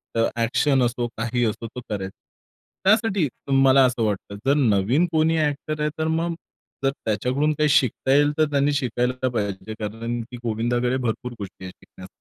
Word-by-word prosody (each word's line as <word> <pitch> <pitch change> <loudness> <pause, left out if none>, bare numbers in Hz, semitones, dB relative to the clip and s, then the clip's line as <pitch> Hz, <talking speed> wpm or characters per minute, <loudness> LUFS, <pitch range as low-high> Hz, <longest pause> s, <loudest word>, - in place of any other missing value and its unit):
तर 115 0 +2
एक्शन 130 +3 +2
असो, 120 0 0
काही 115 +2 -1
असो 115 +1 -3
तो 125 - -8
करायचा. 95 -3 -4 0.7
त्यासाठी 205 -4 +3 0.3
मला 135 0 +6
असं 125 -2 0
वाटतं. 100 -1 -3
जर 135 - +4
नवीन 120 - +3
कोणी 160 0 +2
एक्टर 150 +1 -4
आहे. 150 - +1
तर 160 - 0
मग 165 +1 0 0.5
जर 135 - +3
त्याच्याकडून 125 +8 +1
काही 150 0 +1
शिकता 135 -2 +2
येईल, 145 +1 +4
तर 155 - +4
त्यांनी 140 +1 +2
शिकायला 125 -2 0
तर 130 - +3
पाहिजे 105 -2 -3
कारण, 115 +3 -4
की 125 - -7
गोविंदाकडे 120 +2 0
भरपूर 125 0 -3
गोष्टी 95 -2 -8
आहेत 90 - -8
शिकण्या 95 - -14
125 Hz, 170 wpm, -23 LUFS, 115-145 Hz, 0.7 s, मला